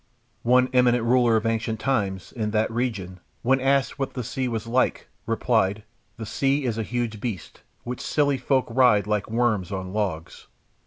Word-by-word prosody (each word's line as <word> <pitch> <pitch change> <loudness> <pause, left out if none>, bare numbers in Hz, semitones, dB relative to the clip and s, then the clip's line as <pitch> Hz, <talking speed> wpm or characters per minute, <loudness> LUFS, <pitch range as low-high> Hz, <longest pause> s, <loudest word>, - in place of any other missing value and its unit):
One 125 +1 +4
eminent 125 -2 +4
ruler 120 -1 +3
of 110 - 0
ancient 115 -1 -1
times, 100 -9 -1
in 110 -3 -3
that 110 +1 0
region, 105 -7 -3 0.2
when 130 +2 +3
asked 135 +1 +1
what 135 - -3
the 125 - -3
sea 130 +3 -3
was 115 -3 -3
like, 125 +3 0 0.2
replied, 110 -3 +1 0.3
"The 115 - -6
sea 135 +5 0
is 115 -2 -1
a - - +1
huge 115 -2 -3
beast 95 -11 -6 0.2
which 125 +1 -5
silly 145 -3 +1
folk 130 +1 +1
ride 115 -4 +4
like 105 -1 -1
worms 110 -5 0
on 95 -1 -5
logs." 95 -7 -3
115 Hz, 170 wpm, -24 LUFS, 105-125 Hz, 0.3 s, One